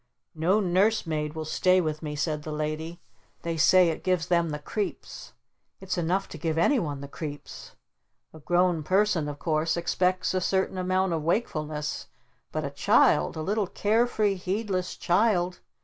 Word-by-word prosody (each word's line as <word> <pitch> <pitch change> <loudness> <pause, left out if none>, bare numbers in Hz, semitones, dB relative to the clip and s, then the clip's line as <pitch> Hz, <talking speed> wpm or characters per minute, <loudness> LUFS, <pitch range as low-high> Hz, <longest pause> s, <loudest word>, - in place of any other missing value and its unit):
"No 175 +6 +2
Nurse 200 +3 +2
Maid 150 -1 -3
will 160 0 -4
stay 185 +4 +3
with 155 -3 -2
me," 150 -2 -5
said 150 +1 -1
the 155 - -7
Lady. 155 +3 -4 0.4
"They 170 0 -2
say 175 +2 +5
it 160 - -4
gives 180 -2 +1
them 170 -2 +2
the 150 - -3
creeps. 200 +8 -5 0.5
It's 190 -1 -3
enough 180 +3 0
to - - -9
give 160 -2 -1
anyone 165 - +1
the 140 - -7
creeps. 145 0 -8 0.6
A 160 - -11
grown 175 +1 +2
person 185 -2 +1
of 145 - -6
course 160 +1 0
expects 180 +2 0
a 185 - 0
certain 190 0 0
amount 185 0 +1
of 160 - -1
wakefulness, 155 -4 -2 0.4
but - - -2
a - - -4
child, 75 0 +3
a 155 - -3
little 205 +2 0
care 220 +6 +1
free 210 -4 +1
heedless 190 0 -2
child 180 -1 +1
175 Hz, 165 wpm, -27 LUFS, 155-190 Hz, 0.6 s, say